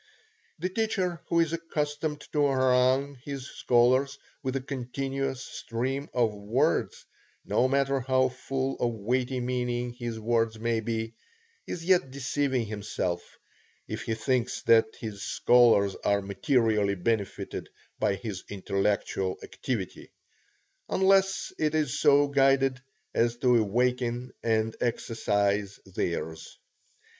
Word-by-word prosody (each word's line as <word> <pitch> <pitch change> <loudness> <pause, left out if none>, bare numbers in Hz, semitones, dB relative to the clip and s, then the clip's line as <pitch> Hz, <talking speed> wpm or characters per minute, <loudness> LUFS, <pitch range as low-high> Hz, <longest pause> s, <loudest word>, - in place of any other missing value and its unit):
The 180 +3 -2
teacher 185 -5 -1
who 170 - +2
is 165 -1 0
accustomed 150 -2 -2
to 145 -2 +3
harangue 130 +1 +2
his 140 -3 -5
scholars 130 +4 +2 0.2
with 130 0 -2
a - - +1
continuous 135 0 -3
stream 135 +5 -3
of 115 -4 +1
words, 105 +5 0 0.4
no 130 - +2
matter 135 0 +1
how 130 0 +2
full 135 +1 -3
of 120 - +1
weighty 125 +4 -1
meaning 125 -1 -2
his 120 -2 -5
words 115 0 +1
may 115 0 0
be, 115 0 -3 0.5
is 165 -2 -5
yet 180 -5 +3
deceiving 135 -2 -1
himself, 100 -4 -4 0.5
if - - -4
he 110 - -2
thinks 125 +1 -1
that 115 -1 +5
his 105 -3 -6
scholars 115 -6 +4
are 100 -1 +2
materially 105 -2 +1
benefited 100 +2 -2 0.3
by 100 - +2
his 100 -3 -6
intellectual 100 -1 -1
activity, 110 -8 -5 0.8
unless 195 0 +3
it 155 0 +1
is 150 -2 0
so 145 -1 +5
guided 135 -2 +3 0.3
as 120 0 +1
to 125 0 +3
awaken 120 +3 0
and 110 -1 +1
exercise 105 -4 0
theirs. 80 -4 -4
125 Hz, 120 wpm, -28 LUFS, 110-135 Hz, 0.8 s, that